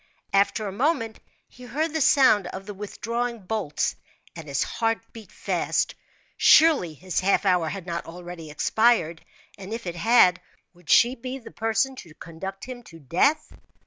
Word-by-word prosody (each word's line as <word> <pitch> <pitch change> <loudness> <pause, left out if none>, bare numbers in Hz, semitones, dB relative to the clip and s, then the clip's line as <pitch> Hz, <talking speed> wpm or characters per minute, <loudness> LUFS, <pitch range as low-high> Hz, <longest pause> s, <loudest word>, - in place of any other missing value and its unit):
After 200 +2 +2
a - - -4
moment, 225 - -1 0.3
he 250 - -19
heard 310 +5 -2
the 315 - -1
sound 255 -9 +4
of 190 +2 -8
the 205 - -7
withdrawing 230 +3 -4
bolts, 195 -7 -2 0.4
and 165 -2 -9
his 140 -1 0
heart 225 -1 -1 0.2
beat 225 -2 -12
fast. - - -1 0.4
Surely, 285 - +5
his 185 +3 -3
half 200 +2 +1
hour 180 -4 +2
had 195 -1 -6
not 170 -2 -5
already 175 -1 -9
expired; 170 0 +1 0.4
and 195 +1 -9
if 230 -1 -5
it 175 -1 -4
had, 185 -2 +4 0.3
would 175 -3 -20
she 240 +2 +5
be 260 +1 -6
the 255 - -12
person 225 +4 0
to 160 -8 -12
conduct 190 +5 -8
him 250 -1 -8
to 170 -8 -14
death? 180 - +1
205 Hz, 165 wpm, -25 LUFS, 175-240 Hz, 0.4 s, Surely